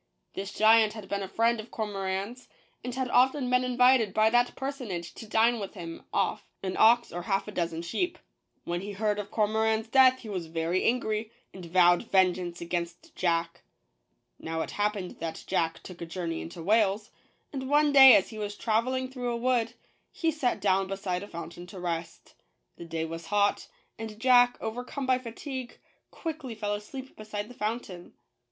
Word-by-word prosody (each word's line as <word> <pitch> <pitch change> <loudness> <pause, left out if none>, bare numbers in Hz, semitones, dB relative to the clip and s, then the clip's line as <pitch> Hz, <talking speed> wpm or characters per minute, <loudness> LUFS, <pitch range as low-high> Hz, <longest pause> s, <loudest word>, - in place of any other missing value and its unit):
This 195 +1 -5
giant 220 0 +5
had 215 -3 -9
been 200 +1 -2
a 195 - -4
friend 230 +4 +1
of 215 +2 -8
Cormoran's, 200 +2 -4 0.4
and 245 0 -4
had 260 -1 -1
often 260 +1 +3
been 250 0 +3
invited 250 -4 +3
by 220 0 +4
that 245 +1 +2
personage 250 - -5
to 225 - -10
dine 225 +2 +3
with 200 0 -6
him 165 -3 -8
off - - 0 0.2
an 185 -1 -2
ox 235 +2 +5
or 175 - -4
half 195 +3 -1
a - - -5
dozen 170 -3 -2
sheep. 340 - -2 0.5
When 175 +1 -3
he 200 +1 -6
heard 210 +1 0
of 205 - -5
Cormoran's 220 +1 +1
death 260 0 +5
he 225 - -10
was 180 -5 -4
very 165 +3 -1
angry, 220 -2 0 0.2
and 185 - -10
vowed 175 0 +5
vengeance 180 -2 +2
against 170 0 -4
Jack. 170 -1 0 0.8
Now 160 0 -3
it - - -4
happened 205 -3 -2
that 165 -1 -5
Jack 165 -1 -1
took 180 -2 -11
a 170 - -5
journey 165 -1 -4
into 170 0 -8
Wales; 210 +1 +2 0.4
and 265 -1 -4
one 295 0 +4
day, 265 -2 +10
as 190 - +2
he 220 - -8
was 205 -1 -4
traveling 255 +4 0
through 250 -2 -4
a 235 - -1
wood, 240 -1 0 0.4
he 330 -1 0
sat 265 -8 -1
down 195 -1 +2
beside 190 -2 -3
a 205 - -8
fountain 170 0 -8
to 185 +1 -10
rest. 170 -1 -5 0.4
The 170 - -9
day 165 -1 -3
was 165 0 -7
hot; 205 +1 +1 0.3
and 220 -1 -7
Jack, 245 0 +5
over 225 +3 -4
come 270 +2 -5
by 255 -1 +2
fatigue, 255 +1 -7 0.3
quickly 310 -8 -6
fell 210 -1 -2
asleep 260 +6 -7
beside 210 -1 -6
the - - -10
fountain. 210 -6 -5
210 Hz, 185 wpm, -28 LUFS, 180-245 Hz, 0.8 s, day